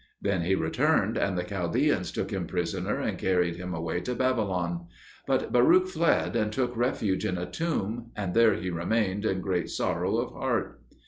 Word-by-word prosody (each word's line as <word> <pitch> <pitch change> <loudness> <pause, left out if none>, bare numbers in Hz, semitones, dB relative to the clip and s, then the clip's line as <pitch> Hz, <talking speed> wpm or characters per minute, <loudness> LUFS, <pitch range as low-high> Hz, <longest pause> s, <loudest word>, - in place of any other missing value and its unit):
Then 100 -3 0
he 90 +3 +2
returned, 80 -2 +1
and 95 -2 0
the 90 - 0
Chaldeans 100 - 0
took - - -3
him - - -2
prisoner 85 -2 -2
and - - -2
carried 90 -2 +1
him 90 0 -5
away 80 +1 -2
to 125 - -3
Babylon. 95 -9 0 0.4
But - - 0
Baruch 165 +10 +6
fled, 170 -8 +1
and 105 -2 +1
took 125 +1 -1
refuge 115 -5 0
in 90 - -1
a 90 - -3
tomb, 120 - -3
and 95 -4 -3
there 115 -1 +5
he 90 +1 -3
remained 100 +4 0
in 95 -3 0
great 90 -2 -1
sorrow - - 0
of - - -2
heart. - - -2
95 Hz, 180 wpm, -28 LUFS, 90-120 Hz, 0.4 s, Baruch